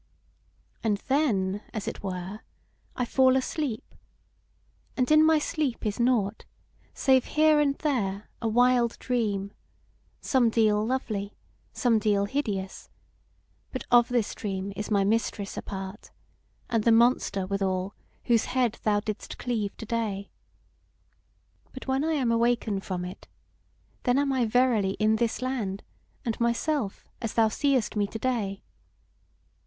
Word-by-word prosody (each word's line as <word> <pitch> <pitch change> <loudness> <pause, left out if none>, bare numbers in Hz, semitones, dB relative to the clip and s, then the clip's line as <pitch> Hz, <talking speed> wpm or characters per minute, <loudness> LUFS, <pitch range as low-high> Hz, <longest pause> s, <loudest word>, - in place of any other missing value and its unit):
"And 215 -3 +2
then, 205 -9 +1
as 215 - -4
it - - -4
were, 190 +1 -5 0.6
I 250 - -1
fall 260 +1 +4
asleep; 265 -3 -3 1.0
and 255 +1 +1
in 310 0 +7
my 320 0 +5
sleep 295 -6 -2
is 210 +1 -2
nought, 230 -4 +1 0.5
save 260 -2 +3
here 310 -1 +6
and 280 -2 +2
there 215 -11 -1
a 230 - 0
wild 245 +1 +3
dream, 205 -6 -1 0.7
somedeal 225 -5 +3
lovely, 215 -6 -2 0.4
somedeal 215 -5 +2
hideous: 200 -7 -3 0.8
but 260 - -4
of 240 -1 +6
this 240 -4 0
dream 195 -1 -4
is 210 +2 -4
my 200 -2 +3
Mistress 205 -1 -1
a - - -4
part, 195 +1 -7 0.6
and 230 -3 0
the 230 - +4
monster, 225 -4 +3
withal, 190 0 -1 0.3
whose 230 -2 +2
head 250 -3 0
thou 205 -1 +2
didst 215 -1 -5
cleave 220 -5 -2
to 225 - -7
day. 210 -3 -3 1.4
But 260 - -8
when 265 +2 0
I 320 +1 +1
am 260 -6 +1
awaken 230 -3 +1
from 180 -2 -4
it, 180 - -9 0.7
then 245 +1 +2
am 280 -1 +2
I 255 -3 +2
verily 220 -5 +2
in 215 +1 +3
this 235 +2 -1
land, 220 -7 -2 0.4
and 230 -2 -2
myself, 235 -1 -1
as 225 - -4
thou 225 -1 +4
seest 260 -1 +1
me 205 -1 +1
to 220 - -6
day. 220 -5 -2
225 Hz, 135 wpm, -27 LUFS, 200-255 Hz, 1.4 s, in